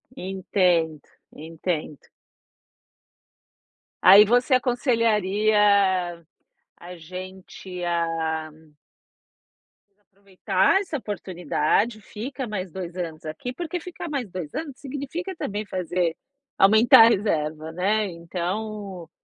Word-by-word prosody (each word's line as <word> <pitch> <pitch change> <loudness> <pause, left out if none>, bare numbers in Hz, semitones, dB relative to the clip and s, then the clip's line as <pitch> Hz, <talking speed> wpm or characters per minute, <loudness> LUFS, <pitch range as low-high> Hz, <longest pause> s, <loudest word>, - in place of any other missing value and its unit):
Entendo, 180 - 0 0.3
entendo. 160 -1 -5 1.9
Aí 200 +3 +9
você 245 +4 +2
aconselharia 210 -7 +2 0.6
a 180 +1 -10
gente 185 +1 -9
a 165 -2 -1 1.5
aproveitar 195 - 0
essa 330 -6 -4
oportunidade, 205 - -1
fica 250 +6 -6
mais 190 -4 -5
2 180 -1 -7
anos 165 -3 -5
aqui. 245 +11 -5
Porque 350 +2 -4
ficar 340 0 -8
mais 265 -8 -3
2 175 -5 -7
anos 310 -4 -4
significa 290 +7 -5
também 210 -7 -4
fazer 180 -3 -2 0.4
aumentar 220 +3 +7
a - - +6
reserva, 160 -7 -1
né. 205 +5 +1
Então, 185 +2 -5
190 Hz, 90 wpm, -24 LUFS, 170-220 Hz, 1.9 s, Aí